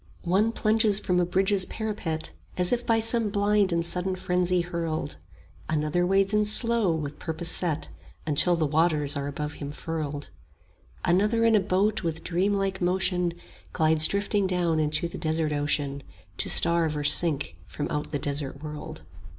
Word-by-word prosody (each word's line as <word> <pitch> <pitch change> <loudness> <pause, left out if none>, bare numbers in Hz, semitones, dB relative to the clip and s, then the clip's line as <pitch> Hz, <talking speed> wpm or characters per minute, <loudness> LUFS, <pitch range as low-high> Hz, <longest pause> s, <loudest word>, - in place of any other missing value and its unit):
One 195 +6 +2
plunges 215 -2 +1
from 180 -3 0
a 175 - +1
bridge's 190 +1 +2
parapet, 205 -8 -4 0.3
As 180 -1 +2
if 245 0 -1
by 230 -1 +3
some 225 -1 +1
blind 205 -1 +1
and 170 0 0
sudden 180 +2 -2
frenzy 180 -1 0
hurled; 170 -2 -4 0.5
Another 155 +3 0
wades 195 +1 +2
in 210 0 +3
slow 225 -1 +3
with 150 -3 -4
purpose 165 +1 -4
set 160 -4 0
10 - - -10 0.3
Until 160 +3 +3
the 165 -2 0
waters 150 -1 +1
are 140 0 -3
above 150 +1 -5
him 140 - -4
furled; 150 - -5 0.7
Another 210 +6 +2
in 230 - +4
a - - +5
boat 200 +3 0
with 165 -2 -4
dreamlike 195 +1 -1
motion 180 -1 0 0.4
Glides 160 -1 +5
drifting 200 0 0
down 175 -3 0
into 155 +3 +1
the 170 - -8
desert 155 -1 -1
ocean, 145 -1 -1 0.4
To - - -1
starve 165 -3 +3
or 145 - -3
sink 150 0 +4
from 145 - -5
out 150 0 -4
the 145 - -1
desert 140 0 -4
world. 150 -1 -8
175 Hz, 165 wpm, -26 LUFS, 155-195 Hz, 0.7 s, a